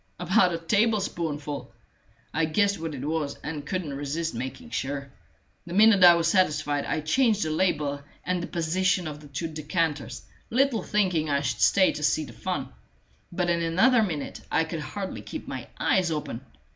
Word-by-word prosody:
About 180 +1 +3
a 170 - -1
tablespoonful! 165 -7 -1 0.6
I 165 +1 +2
guessed 200 +5 +1
what 160 -2 -4
it 135 +1 -5
was, 150 -2 -2
and 150 -1 -4
couldn't 170 -4 -3
resist 145 +4 -3
making 130 +2 -6
sure; 140 0 -3 0.6
the 170 - -5
minute 210 -2 +6
I 175 -1 +10
was 165 -1 +1
satisfied, 150 -5 +1
I - - -1
changed 215 - +2
the 155 - -2
label 150 -4 0 0.2
and 180 -1 -1
the 170 - -4
position 180 +2 0
of 150 -1 -6
the 150 - -13
two 140 +4 -4
decanters, 155 -5 -2 0.3
little 260 -1 +2
thinking 180 -7 +1
I 140 -1 +2
should 145 - -2
stay 190 -2 +5
to - - -6
see 155 +1 +1
the - - -11
fun; - - -3 0.6
but 175 0 0
in 170 0 +1
another 190 +10 +4
minute 160 -9 -3
I 160 - +3
could 160 0 -5
hardly 190 +5 -5
keep - - -7
my - - -6
eyes 185 -3 +2
open. 150 -6 -4
165 Hz, 175 wpm, -26 LUFS, 150-185 Hz, 0.6 s, I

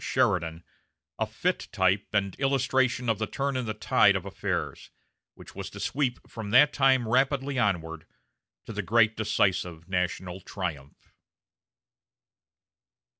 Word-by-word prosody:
Sheridan, 80 0 0 0.6
a - - 0
fit - - -2
type 95 +2 +1
and 100 -2 0
illustration 130 -2 +1
of 110 -2 +1
the 110 - -1
turn 140 +3 -2
in 125 -3 -2
the 110 - -3
tide 105 -1 +4
of 95 0 -3
affairs, 100 - -4 0.5
which - - -13
was - - -6
to - - -10
sweep 135 -3 -2
from 110 -3 -7
that 130 +7 +6
time 130 -4 +3
rapidly 135 +2 +1
onward 80 -7 -1 0.6
to 115 - -7
the 105 - -2
great 110 +2 +3
decisive 95 -6 0
national 90 0 -2
triumph. 80 -9 -7
105 Hz, 130 wpm, -27 LUFS, 95-130 Hz, 0.6 s, that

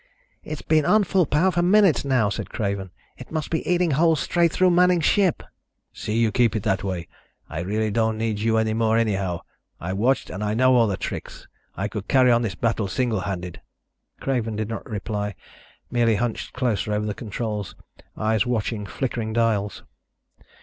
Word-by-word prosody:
"It's 155 -1 -6
been 155 -1 +3
on 215 +7 +4
full 185 -3 +2
power 170 +6 +3
for 175 - +1
minutes 190 -1 +4
now," 130 -7 +2
said - - -4
Craven. 100 -4 -3 0.3
"It 125 - -11
must 155 -1 -3
be 160 - -1
eating 175 -2 +2
holes 160 +2 +3
straight 170 +1 +2
through 185 +2 +3
Manning's 180 -1 +4
ship." 195 -6 +2 0.5
"See 105 +1 -3
you 115 -2 +3
keep 115 +1 +2
it 105 - -2
that 95 -1 0
way. 90 -3 -3 0.4
I 80 - -5
really 105 +5 -1
don't 110 0 +1
need 110 -2 -1
you 110 +1 +1
any 110 0 +1
more, 110 0 +2
anyhow. 100 -6 0 0.4
I've 95 +3 -4
watched 125 +6 +1
and 100 +3 -4
I 105 0 -1
know 130 +2 +4
all 115 -2 +4
the 100 -2 -1
tricks. - - -6 0.3
I 95 - -1
could 105 -1 -6
carry 130 -2 +5
on 120 0 +4
this 105 -6 -2
battle 110 -1 0
single 120 0 0
handed." 90 -3 -5 0.6
Craven 120 -5 -1
did 110 0 -3
not 115 - -6
reply, 105 -1 -3 0.6
merely 120 -2 +3
hunched 120 +1 -3
closer 115 -5 -1
over 105 0 -1
the 105 - -2
controls, 105 -2 -4 0.4
eyes 110 -1 +1
watching 110 -3 -2
flickering 115 -3 -3
dials. 110 -3 0
115 Hz, 185 wpm, -24 LUFS, 105-135 Hz, 0.6 s, carry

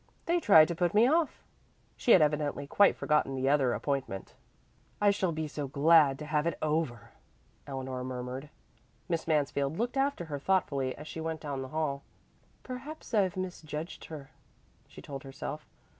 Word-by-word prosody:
They 345 +1 +2
try 180 - +7
to 170 - -3
put 175 +2 0
me 220 +3 +6
off." 320 +2 +1 0.5
She 240 - +1
had 175 - +7
evidently 150 -1 0
quite 200 +8 +4
forgotten 150 -3 +1
the 130 0 -1
other 140 -3 +3
appointment. 130 -8 -3 0.7
"I 205 -1 +5
shall 190 -3 0
be 155 -1 -3
so 145 -1 -4
glad 145 0 +5
to 150 - -7
have 150 +1 0
it 170 - -1
over," 150 -8 -2 0.6
Eleanor 130 -2 -4
murmured. 130 +2 -5 0.6
Miss 165 -3 -2
Mansfield 145 -1 0
looked 240 +4 -1
after 270 -9 0
her 145 -3 -5
thoughtfully 140 -6 0
as 150 - -9
she 160 - -6
went 160 0 -3
down 140 -3 -4
the 130 - -5
hall. 140 -1 -2 0.6
"Perhaps 265 +3 -8
I've 190 -4 +2
misjudged 165 -3 -5
her," 145 -4 -9 0.6
she - - -13
told 140 -2 -7
herself. 135 +3 -7
150 Hz, 165 wpm, -30 LUFS, 140-175 Hz, 0.7 s, try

